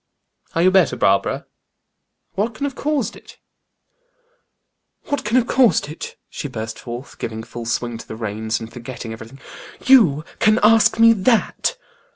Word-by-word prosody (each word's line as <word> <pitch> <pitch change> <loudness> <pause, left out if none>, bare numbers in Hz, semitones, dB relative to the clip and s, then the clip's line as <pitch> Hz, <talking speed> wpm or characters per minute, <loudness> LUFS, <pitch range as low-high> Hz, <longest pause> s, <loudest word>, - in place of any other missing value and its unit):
"Are 165 - +2
you 185 - +5
better, 190 -2 +3
Barbara? 100 0 +1 0.9
What 215 +4 -2
can 250 - -6
have 285 -1 -1
caused 285 -2 -2
it?" - - -15 1.7
"What 285 - -2
can 215 +4 +1
have 250 - +3
caused 240 - +3
it?" 155 - -8
she 145 - -6
burst 110 -4 -6
forth, 120 +3 -8
giving 110 0 -5
full 115 0 -8
swing 120 -1 -2
to - - -11
the - - -7
reins, 110 0 -3
and 115 0 -9
forgetting 120 -1 -7
everything. 115 +4 -11 0.5
"You 175 - +5
can 215 0 +4
ask 225 +1 +5
me 230 0 +7
that?" 230 - +1
155 Hz, 155 wpm, -20 LUFS, -, 1.7 s, me